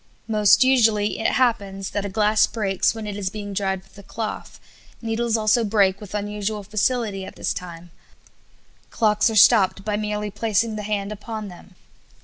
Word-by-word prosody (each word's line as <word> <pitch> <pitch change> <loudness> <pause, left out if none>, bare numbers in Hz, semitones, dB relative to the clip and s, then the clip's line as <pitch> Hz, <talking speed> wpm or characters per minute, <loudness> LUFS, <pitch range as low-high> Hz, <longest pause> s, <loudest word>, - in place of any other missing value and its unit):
Most 215 +1 +4
usually 225 -5 +2
it 225 - 0
happens 200 -6 0
that 205 -1 -3
a - - -3
glass 210 +2 +3
breaks 200 -2 0
when 220 -1 -6
it 205 -1 -5
is 195 -2 -2
being 205 0 -7
dried 190 -1 -2
with 195 - -24
a - - -9
cloth; 215 +2 -6 0.4
needles 230 0 -1
also 220 +2 +2
break 200 -2 +2
with 210 0 -8
unusual 210 0 -3
facility 215 0 -1
at - - -10
this - - -2
time; 175 -1 -9 1.0
clocks 215 -1 +2
are 225 - -4
stopped 195 -2 +5
by 210 -1 -1
merely 210 0 -3
placing 220 +1 0
the 210 - -4
hand 205 -1 -3
upon 215 0 -6
them. 180 +1 -15
210 Hz, 170 wpm, -22 LUFS, 195-220 Hz, 1.0 s, stopped